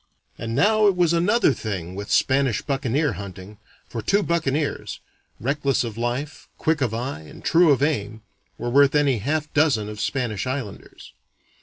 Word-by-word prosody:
And 115 Hz, 0 st, -5 dB
now 215 Hz, -, +4 dB
it 195 Hz, -, +3 dB
was 175 Hz, -2 st, +2 dB
another 180 Hz, -, +3 dB
thing 95 Hz, -7 st, -5 dB
with 100 Hz, +2 st, -7 dB
Spanish 135 Hz, -4 st, +2 dB
buccaneer 140 Hz, 0 st, 0 dB
hunting, 100 Hz, +1 st, -9 dB, 0.3 s
for 115 Hz, -, -5 dB
two 200 Hz, -, +2 dB
buccaneers, 155 Hz, -4 st, -1 dB, 0.4 s
reckless 140 Hz, +2 st, 0 dB
of 115 Hz, -3 st, -5 dB
life, 120 Hz, +6 st, -4 dB
quick 160 Hz, -2 st, 0 dB
of 125 Hz, -5 st, +1 dB
eye, 120 Hz, -, -4 dB
and 80 Hz, -, -13 dB
true 170 Hz, 0 st, +5 dB
of 140 Hz, -1 st, +3 dB
aim, 110 Hz, -7 st, -1 dB, 0.3 s
were 120 Hz, -, -3 dB
worth 140 Hz, +2 st, +5 dB
any 140 Hz, -5 st, +3 dB
half 150 Hz, +6 st, -2 dB
dozen 145 Hz, -9 st, +2 dB
of 105 Hz, 0 st, -6 dB
Spanish 110 Hz, +1 st, -2 dB
islanders. 130 Hz, -6 st, -6 dB
135 Hz, 160 wpm, -23 LUFS, 110-150 Hz, 0.4 s, true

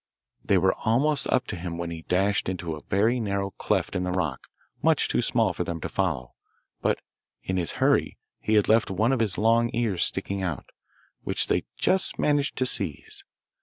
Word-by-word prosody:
They 100 Hz, -, +3 dB
were 95 Hz, +1 st, +3 dB
almost 140 Hz, +7 st, +2 dB
up 130 Hz, -, +1 dB
to -, -, -5 dB
him 85 Hz, -1 st, -5 dB
when 85 Hz, 0 st, -4 dB
he 80 Hz, -1 st, -6 dB
dashed 95 Hz, +4 st, +1 dB
into 90 Hz, -3 st, -3 dB
a 75 Hz, -, -10 dB
very 110 Hz, +6 st, +1 dB
narrow 100 Hz, -3 st, -2 dB
cleft -, -, -1 dB
in 90 Hz, -, 0 dB
the 90 Hz, -, -2 dB
rock, 80 Hz, -8 st, -2 dB, 0.3 s
much -, -, +3 dB
too -, -, +1 dB
small -, -, +1 dB
for -, -, -2 dB
them 85 Hz, -1 st, -4 dB
to -, -, -4 dB
follow; 80 Hz, -11 st, -2 dB, 0.5 s
but -, -, +1 dB, 0.4 s
in 95 Hz, -, -2 dB
his 85 Hz, -4 st, -1 dB
hurry -, -, +2 dB, 0.2 s
he 110 Hz, -, 0 dB
had 105 Hz, -, +4 dB
left 110 Hz, +1 st, +4 dB
one 110 Hz, +6 st, +1 dB
of 135 Hz, -, +1 dB
his 110 Hz, -5 st, 0 dB
long 115 Hz, +2 st, +3 dB
ears 110 Hz, -7 st, +1 dB
sticking 95 Hz, 0 st, -1 dB
out, 90 Hz, -5 st, -4 dB, 0.5 s
which -, -, +1 dB
they -, -, +1 dB
just 190 Hz, 0 st, +1 dB
managed 145 Hz, -1 st, +1 dB
to 130 Hz, -, +2 dB
seize. 95 Hz, -, -2 dB
100 Hz, 195 wpm, -26 LUFS, 90-115 Hz, 0.5 s, had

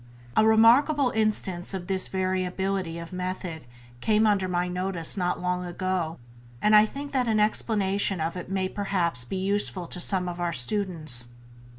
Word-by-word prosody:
A -, -, +5 dB
remarkable 245 Hz, +5 st, +5 dB
instance 200 Hz, -4 st, 0 dB
of 180 Hz, -2 st, -5 dB
this 190 Hz, 0 st, +1 dB
variability 185 Hz, -1 st, -2 dB
if 170 Hz, +2 st, -8 dB
method 180 Hz, -4 st, -5 dB, 0.3 s
came 215 Hz, -, +2 dB
under 200 Hz, -3 st, +2 dB
my 180 Hz, 0 st, -1 dB
notice 180 Hz, -2 st, 0 dB
not 180 Hz, -2 st, -1 dB
long 180 Hz, 0 st, -1 dB
ago, 175 Hz, -2 st, -3 dB, 0.4 s
and 215 Hz, 0 st, +4 dB
I 210 Hz, +1 st, +7 dB
think 285 Hz, +4 st, -7 dB
that 255 Hz, -3 st, 0 dB
an 220 Hz, -1 st, +2 dB
explanation 205 Hz, -3 st, +1 dB
of 160 Hz, +2 st, -2 dB
it 180 Hz, 0 st, -7 dB
may 190 Hz, -1 st, -1 dB
perhaps 185 Hz, -, -1 dB
be 190 Hz, -, -4 dB
useful 190 Hz, -1 st, 0 dB
to 180 Hz, -, -4 dB
some 180 Hz, 0 st, +1 dB
of 175 Hz, 0 st, -5 dB
our 175 Hz, -1 st, -1 dB
students. 155 Hz, -, -1 dB
185 Hz, 165 wpm, -26 LUFS, 175-210 Hz, 0.4 s, I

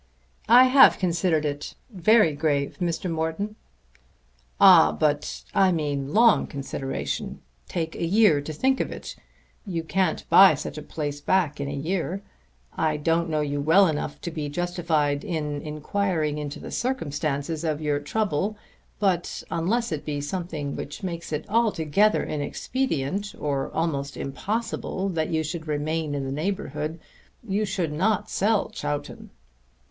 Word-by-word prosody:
"I 245 Hz, +2 st, +9 dB
have 260 Hz, +1 st, +7 dB
considered 170 Hz, -3 st, +1 dB
it, 145 Hz, 0 st, -4 dB, 0.2 s
very 205 Hz, -2 st, +4 dB
grave, 145 Hz, -1 st, -1 dB
Mr. 175 Hz, +1 st, -1 dB
Morton." 165 Hz, +6 st, -2 dB, 1.0 s
"Ah, 75 Hz, -, +8 dB
but 145 Hz, -, -1 dB
I 190 Hz, -1 st, +4 dB
mean 145 Hz, -4 st, -2 dB
long 230 Hz, +4 st, +5 dB
consideration. 135 Hz, -1 st, -4 dB, 0.3 s
Take 165 Hz, -2 st, -3 dB
a -, -, -4 dB
year 180 Hz, -4 st, +4 dB
to 145 Hz, -, -6 dB
think 265 Hz, -, +1 dB
of -, -, -2 dB
it. -, -, -7 dB, 0.5 s
You 170 Hz, -5 st, -3 dB
can't 190 Hz, +3 st, -1 dB
buy 190 Hz, -5 st, +8 dB
such 150 Hz, -, -6 dB
a -, -, -8 dB
place 145 Hz, -1 st, -5 dB
back 155 Hz, -5 st, +1 dB
in 140 Hz, -, -2 dB
a -, -, -4 dB
year. 175 Hz, +6 st, -2 dB, 0.5 s
I 155 Hz, -1 st, 0 dB
don't 165 Hz, +2 st, +1 dB
know 155 Hz, -1 st, 0 dB
you 145 Hz, -1 st, -2 dB
well 165 Hz, +7 st, +5 dB
enough 150 Hz, -3 st, -2 dB
to 170 Hz, -, -4 dB
be 155 Hz, -3 st, -4 dB
justified 160 Hz, -3 st, 0 dB
in 150 Hz, -4 st, -3 dB
inquiring 155 Hz, 0 st, -1 dB
into 145 Hz, -1 st, -5 dB
the -, -, -8 dB
circumstances 155 Hz, -, -2 dB
of 155 Hz, -2 st, -1 dB
your 150 Hz, -2 st, 0 dB
trouble; 200 Hz, +4 st, -1 dB, 0.4 s
but 185 Hz, -4 st, 0 dB
unless 200 Hz, +8 st, 0 dB
it 155 Hz, -2 st, -3 dB
be 145 Hz, -1 st, -3 dB
something 150 Hz, -2 st, -4 dB
which 145 Hz, +7 st, -7 dB
makes 170 Hz, -3 st, -5 dB
it 150 Hz, 0 st, -3 dB
altogether 210 Hz, -2 st, +2 dB
inexpedient, 190 Hz, -, -2 dB
or 140 Hz, -2 st, -1 dB
almost 140 Hz, -4 st, -2 dB
impossible 195 Hz, +5 st, -3 dB
that 160 Hz, -4 st, -1 dB
you 160 Hz, -1 st, 0 dB
should 160 Hz, +1 st, -5 dB
remain 155 Hz, 0 st, -1 dB
in 140 Hz, -1 st, -2 dB
the 135 Hz, -, -4 dB
neighbourhood, 155 Hz, -1 st, -3 dB, 0.5 s
you 205 Hz, +2 st, 0 dB
should 185 Hz, -6 st, -2 dB
not 190 Hz, +7 st, 0 dB
sell 210 Hz, +1 st, +1 dB
Chowton." 145 Hz, 0 st, -5 dB
160 Hz, 145 wpm, -25 LUFS, 145-190 Hz, 1.0 s, I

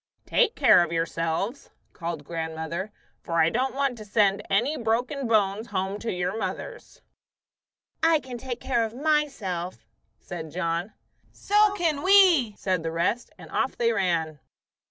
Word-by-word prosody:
"Take 480 Hz, -2 st, +2 dB
care -, -, +6 dB
of 170 Hz, -, -4 dB
yourselves," 165 Hz, -, -2 dB, 0.2 s
called 165 Hz, -3 st, -5 dB
grandmother, 160 Hz, +4 st, -4 dB, 0.3 s
"for 170 Hz, -, -7 dB
I 160 Hz, 0 st, +4 dB
don't 260 Hz, +2 st, -1 dB
want 275 Hz, -4 st, -1 dB
to -, -, -7 dB
send 205 Hz, -1 st, +2 dB
any 245 Hz, +10 st, +2 dB
broken 245 Hz, +3 st, -1 dB
bones 215 Hz, 0 st, +1 dB
home 195 Hz, 0 st, -2 dB
to 230 Hz, -, -3 dB
your 180 Hz, +2 st, -2 dB
mothers." -, -, -6 dB, 1.0 s
"I 325 Hz, -1 st, +4 dB
can 255 Hz, -4 st, -8 dB
take 250 Hz, -1 st, -5 dB
care 240 Hz, -3 st, 0 dB
of 225 Hz, 0 st, -4 dB
myself," 255 Hz, -, -1 dB, 0.3 s
said 165 Hz, -3 st, -7 dB
John. 170 Hz, +3 st, -2 dB, 0.4 s
"So 415 Hz, 0 st, +2 dB
can 325 Hz, -7 st, 0 dB
we," 355 Hz, -, +5 dB
said 185 Hz, -3 st, -1 dB
the 165 Hz, -, -3 dB
rest; 175 Hz, +9 st, -1 dB
and -, -, -13 dB
off -, -, -1 dB
they 230 Hz, -1 st, +2 dB
ran. 165 Hz, -7 st, 0 dB
215 Hz, 150 wpm, -26 LUFS, 170-265 Hz, 1.0 s, care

